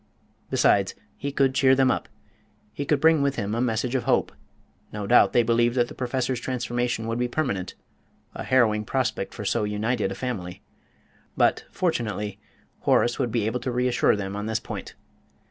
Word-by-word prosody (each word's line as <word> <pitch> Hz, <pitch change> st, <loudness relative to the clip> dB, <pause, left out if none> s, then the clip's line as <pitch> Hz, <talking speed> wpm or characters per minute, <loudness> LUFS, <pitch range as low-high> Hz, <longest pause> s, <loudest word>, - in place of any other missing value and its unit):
Besides, 100 Hz, -1 st, +2 dB, 0.2 s
he 140 Hz, +1 st, -4 dB
could 135 Hz, -1 st, +2 dB
cheer 130 Hz, 0 st, +4 dB
them 130 Hz, -1 st, +4 dB
up; -, -, -3 dB, 0.6 s
he 145 Hz, -, -4 dB
could 150 Hz, -1 st, +2 dB
bring 160 Hz, 0 st, +4 dB
with 140 Hz, -1 st, +1 dB
him 105 Hz, -2 st, -2 dB
a 115 Hz, -, 0 dB
message 120 Hz, 0 st, -1 dB
of 130 Hz, -, -1 dB
hope. -, -, +2 dB, 0.6 s
No 105 Hz, -1 st, -5 dB
doubt 120 Hz, +5 st, +5 dB
they 120 Hz, -, +4 dB
believed 120 Hz, +1 st, +2 dB
that 120 Hz, -1 st, +2 dB
the -, -, -8 dB
Professor's 130 Hz, 0 st, -2 dB
transformation 120 Hz, -2 st, -2 dB
would 115 Hz, +1 st, -2 dB
be 125 Hz, -, +1 dB
permanent 120 Hz, -, -2 dB, 0.6 s
a -, -, -6 dB
harrowing 110 Hz, -5 st, +3 dB
prospect 120 Hz, -3 st, -2 dB
for 105 Hz, -, -7 dB
so 115 Hz, +2 st, +1 dB
united 105 Hz, +3 st, -1 dB
a -, -, -4 dB
family; 95 Hz, -8 st, -5 dB, 0.7 s
but, -, -, +2 dB
fortunately, 110 Hz, -, -2 dB, 0.4 s
Horace 120 Hz, +3 st, +2 dB
would 125 Hz, -4 st, 0 dB
be 110 Hz, -2 st, 0 dB
able 115 Hz, +3 st, -1 dB
to 125 Hz, +1 st, -3 dB
reassure 125 Hz, -1 st, +2 dB
them 100 Hz, -1 st, -4 dB
on 105 Hz, +1 st, -4 dB
this 110 Hz, 0 st, 0 dB
point. -, -, -7 dB
120 Hz, 180 wpm, -25 LUFS, 105-130 Hz, 0.7 s, doubt